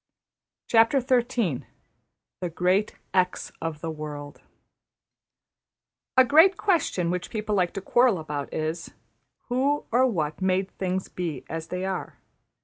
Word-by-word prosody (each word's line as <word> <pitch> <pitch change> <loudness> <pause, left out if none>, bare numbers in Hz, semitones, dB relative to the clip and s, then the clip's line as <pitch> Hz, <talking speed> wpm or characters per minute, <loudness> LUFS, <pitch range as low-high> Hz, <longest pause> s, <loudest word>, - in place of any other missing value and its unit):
\chapter{The 235 - +2 0.9
Great 185 +4 +1 0.2
$x$ 185 -1 +1
of 160 -2 -4
the 165 - -3
World} 150 -2 -7 1.8
A 260 - +8
great 325 +8 +6
question 285 - +1
which 180 0 -3
people 215 -2 -3
like 180 -3 +2
to 195 - -3
quarrel 240 +1 +3
about 150 -3 -5
is: 160 +2 -3 0.6
Who 275 +4 +1
or 255 +3 +4
What 155 -8 -2
made 190 +1 +1
things 185 0 -1
be 165 -7 -4
as 165 0 -5
they 180 +1 -3
are? 190 -1 -4
185 Hz, 120 wpm, -26 LUFS, 165-240 Hz, 1.8 s, A